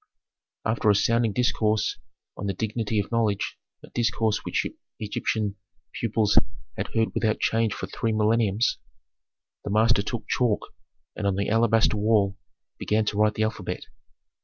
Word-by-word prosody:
After 110 -1 +2
a 105 - +5
sounding 115 +2 +2
discourse 110 -2 +1 0.4
on 100 - -4
the 100 - -1
dignity 110 +1 -1
of 100 - -3
knowledge, 110 -4 0 0.2
a - - -12
discourse 110 -2 +1
which - - -1 0.3
Egyptian 105 -1 -2 0.4
pupils 110 -2 +3 0.4
had - - -3
heard 110 0 +1
without 110 -1 +1
change 115 -1 +1
for - - -4
three 110 +4 -2
millenniums, 110 0 +2 0.8
the - - -4
master 110 0 +4
took 110 +2 -5
chalk 120 -5 0 0.4
and 105 - -1
on 100 - +1
the 100 +1 -1
alabaster 115 0 +3
wall 105 -2 +2 0.4
began 110 +1 +1
to 105 - -1
write 105 0 +3
the 110 - +1
alphabet. 110 -4 -3
110 Hz, 145 wpm, -26 LUFS, 105-115 Hz, 0.8 s, a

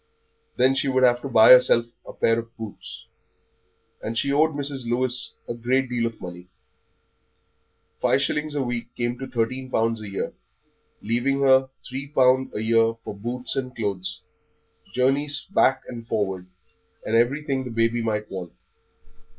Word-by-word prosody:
Then 130 +2 +4
she 135 +1 0
would 130 -1 +2
have 120 -1 +4
to 140 - -5
buy 110 -2 +7
herself 125 -2 +7 0.2
a - - -7
pair 115 0 +1
of 115 0 -10
boots; 110 -3 -9 1.0
and 115 +1 -4
she 140 +4 +1
owed 155 +1 +3
Mrs. 140 -4 -2
Lewis 125 +1 +1
a - - -3
good 125 +3 0
deal 120 -2 0
of 115 - -8
money. 90 0 -9 1.5
Five - - +2
shillings 150 0 -1
a 140 - 0
week 120 -1 -5
came 120 0 -2
to 135 - -5
thirteen 130 +2 -2
pound 115 -2 0
a 105 -2 -7
year, 100 - -4 0.7
leaving 120 +5 0
her 130 -1 +4 0.2
three 135 +2 -6
pound 130 -2 +3
a 105 - -2
year 115 0 +3
for - - -6
boots 120 +5 -4
and 130 -1 -3
clothes, 95 -5 -3 0.7
journeys 140 +5 +1
back 135 -7 +3
and 115 -2 -8
forward, 95 -4 -2 0.6
and 110 - 0
everything 135 +3 +1
the 125 - -6
baby 115 +1 +1
might 105 -2 -2
want. 90 -3 -6
120 Hz, 160 wpm, -24 LUFS, 115-130 Hz, 1.5 s, buy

